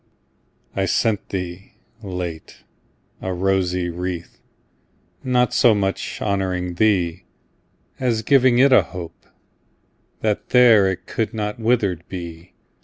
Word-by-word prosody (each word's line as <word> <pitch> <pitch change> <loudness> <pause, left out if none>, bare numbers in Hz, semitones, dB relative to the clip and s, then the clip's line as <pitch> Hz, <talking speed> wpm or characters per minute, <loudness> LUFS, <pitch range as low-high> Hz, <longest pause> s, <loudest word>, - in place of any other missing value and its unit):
I 95 - +1
sent 105 +1 0
thee, 90 0 -6 0.3
late, 90 -5 -6 0.6
a 95 - -3
rosy 90 -1 0
wreath, 90 0 -5 0.8
Not 125 -1 +1
so 120 -4 +5
much 95 -1 -2
honouring 95 -3 -1
thee, 90 -3 +1 0.7
As 115 -4 0
giving 130 -1 +4
it 135 +1 +5
a - - +7
hope, 90 -3 -10 0.9
that 105 -2 -1
there 115 -6 +6
It 90 0 -7
could 110 +1 -3
not 105 0 -3
withered 110 -7 +1
be. 85 -2 -8
95 Hz, 110 wpm, -21 LUFS, 90-110 Hz, 0.9 s, a